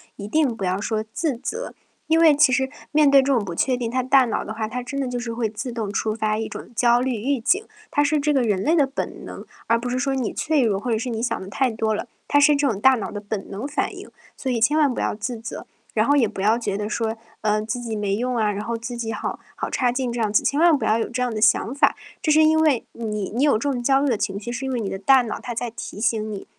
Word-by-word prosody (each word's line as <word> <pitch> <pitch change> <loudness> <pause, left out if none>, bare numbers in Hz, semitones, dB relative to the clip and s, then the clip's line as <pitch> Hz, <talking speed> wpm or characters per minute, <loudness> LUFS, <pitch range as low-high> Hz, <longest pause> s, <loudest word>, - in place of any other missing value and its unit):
一 200 - -7
定 275 0 +1
不 195 -4 -3
要 185 +2 -1
说 220 0 -1
自 295 -7 -1
责。 465 - -5 0.3
因 320 +1 +3
为 320 -3 +6
其 290 -2 +5
实 265 +1 +1 0.2
面 295 -1 +5
对 275 - +7
这 275 - +2
种 235 -5 +1
不 175 -3 -5
确 255 +8 +1
定， 240 -2 -3
它 255 +1 0
大 260 0 +5
脑 230 - -2
的 220 - -5
话， 220 -1 -3
它 250 +2 -4
真 275 +3 -5
的 260 - -2
就 245 0 -3
是 240 -1 -4
会 230 -1 -1
自 220 +4 -5
动 225 -4 -3
触 215 +2 -1
发 215 -1 -1
一 225 - -3
种 - - -8
焦 240 +1 +4
虑 255 -2 -1
预 260 +5 -1
警， 390 - +1 0.2
它 290 - +2
是 300 +1 +2
这 295 +1 +1
个 265 -3 +2
人 205 -4 +1
类 315 +10 +2
的 295 -4 +4
本 270 +1 -5
能， - - -8 0.2
而 230 0 +2
不 245 - -4
是 250 - -1
说 275 +1 0
你 260 -5 -1
脆 310 -2 +1
弱， 210 -5 +1
或 240 +3 -3
者 220 - +1
是 245 +2 -3
你 225 0 -3
想 - - -1
得 190 - -8
太 255 +5 0
多 220 -1 -1
了， 235 - -4 0.2
它 290 - +4
是 290 +1 +5
这 285 -1 +2
种 200 -4 -2
大 265 +4 +6
脑 215 - -4
的 205 - -5
本 205 -1 -5
能 210 +8 -5
反 295 - -2
应。 - - -11 0.3
所 260 - -2
以 235 - 0
千 295 +7 +3
万 290 -5 +3
不 - - -4
要 - - -1
自 230 +3 -4
责， 230 +1 -7 0.3
然 215 - +3
后 285 +3 +3
也 250 -6 +4
不 200 -2 -6
要 220 +4 +3
觉 200 -4 -2
得 210 0 -3
说， 225 0 -2 0.2
呃， 210 0 +1
自 245 +3 -3
己 225 -2 -4
没 205 -2 -1
用 250 +1 -1
啊， 210 -2 +2
然 205 +1 -4
后 230 +1 -3
自 235 +1 -6
己 230 -1 -3
好 - - -4 0.2
好 - - -4
差 250 -2 +1
劲 250 0 -2
这 235 0 -3
样 215 -2 0
子， 210 - +3
千 285 - +1
万 335 -3 +5
不 - - -3
要 220 +1 +2
有 - - -2
这 250 +1 -1
样 245 - -1
的 215 - -3
想 230 +2 +3
法。 285 - +3 0.3
这 310 - +1
是 310 +1 +6
因 315 0 +4
为 300 -7 +2
你 210 -4 -4
你 250 +5 +1
有 295 - +4
这 255 +7 0
种 245 -2 -2
焦 270 +2 +3
虑 285 - +2
的 235 - +2
情 200 -1 -2
绪， 240 +3 -6
是 265 +2 -4
因 265 - -2
为 245 - -1
你 205 - -3
的 195 - -4
大 255 +5 +5
脑 225 - -4
它 240 -1 -5
在 235 0 -3
提 220 - -8
醒 215 -1 0
你， 200 -2 -6
240 Hz, 325 characters per minute, -23 LUFS, 215-270 Hz, 0.3 s, 对